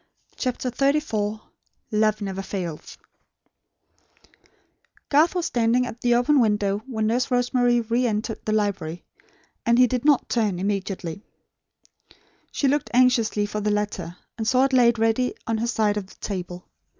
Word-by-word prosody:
CHAPTER 255 -1 -2
XXXIV 240 -6 0 0.5
"LOVE 215 0 +1
NEVER 195 -1 -4
FAILETH" 180 -5 -6 2.1
Garth 310 +5 +4
was 355 -2 0
standing 240 +1 +1
at 240 -1 -8
the 240 -1 +3
open 270 +4 +3
window, 205 -3 +1
when 220 -4 -2
Nurse 240 +4 0
Rosemary 245 -1 +2
re 235 +2 0
entered 220 +1 -3
the 215 - -2
library; 200 -6 -1 0.6
and 235 0 +3
he 250 - +7
did 250 0 -2
not 290 -3 +3
turn, 215 -6 0
immediately. 195 -2 -3 1.3
She 280 - 0
looked 290 +2 0
anxiously 235 -5 +3
for 210 +1 -4
the 210 - 0
letter, 205 -5 -2 0.2
and 220 - -2
saw 255 +2 +4
it 270 - -2
laid 240 -2 +4
ready 225 +3 +1
on 225 -1 -1
her 235 - -1
side 215 -3 +1
of 200 -2 -4
the - - -17
table. 180 -2 -6
225 Hz, 150 wpm, -24 LUFS, 205-250 Hz, 2.1 s, he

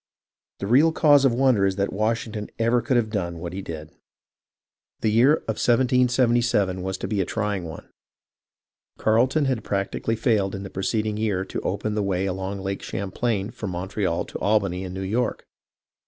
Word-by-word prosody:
The - - -4
real 135 +10 +5
cause 145 -3 +5
of 135 - +5
wonder 125 -5 +3
is 95 -1 +2
that 100 -1 -1
Washington 110 0 -2
ever 115 +1 +2
could 130 - +1
have 110 -2 0
done 85 -5 -2
what 85 +1 -6
he 95 - -4
did. 80 -3 -7 1.1
The 110 - +2
year 120 +7 +5
of 110 -8 -2
1777 120 -6 +2
was 95 +1 -3
to - - -4
be 105 -3 0
a - - 0
trying 105 -2 -2
one. 80 0 -9 1.1
Carleton 130 +7 +2
had 130 -4 -1
practically 100 +3 -1
failed 110 -4 +1
in 95 - -6
the 95 - -8
preceding 105 +2 -1
year 100 -4 0
to - - -5
open 110 - -2
the 105 - 0
way 95 -1 0
along 95 +1 -3
Lake 95 0 -3
Champlain 100 +2 -2
from 110 -3 -6
Montreal 90 0 -2
to - - -7
Albany 100 -3 +1
and 90 0 -6
New 95 - -4
York. 115 +5 -1
105 Hz, 175 wpm, -24 LUFS, 95-120 Hz, 1.1 s, real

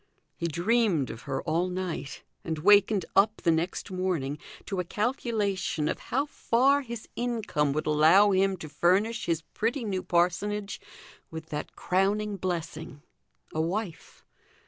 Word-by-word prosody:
He 170 - -2
dreamed 175 - +1
of 115 - -9
her 135 - -2
all 165 +3 0
night, 180 -6 -4 0.2
and 160 -1 -3
wakened 200 +2 +4
up 215 +2 +4
the 170 - +4
next 170 +4 -2
morning 170 -7 -2 0.3
to 195 - -3
a - - +1
calculation 205 - -1
of - - -2
how 275 +3 +1
far 275 0 +2
his 235 -4 -7
income 225 -12 0
would 155 - -2
allow 160 +7 +5
him 190 0 +2
to 160 - -8
furnish 190 +9 +1
his 165 -1 0
pretty 240 +4 -1
new 195 -4 -2
parsonage 195 +4 0 0.5
with 160 0 -8
that 150 0 -5
crowning 200 +2 0
blessing, 165 -4 -4 0.5
a 155 - 0
wife. 180 +2 -4
185 Hz, 145 wpm, -28 LUFS, 160-210 Hz, 0.5 s, allow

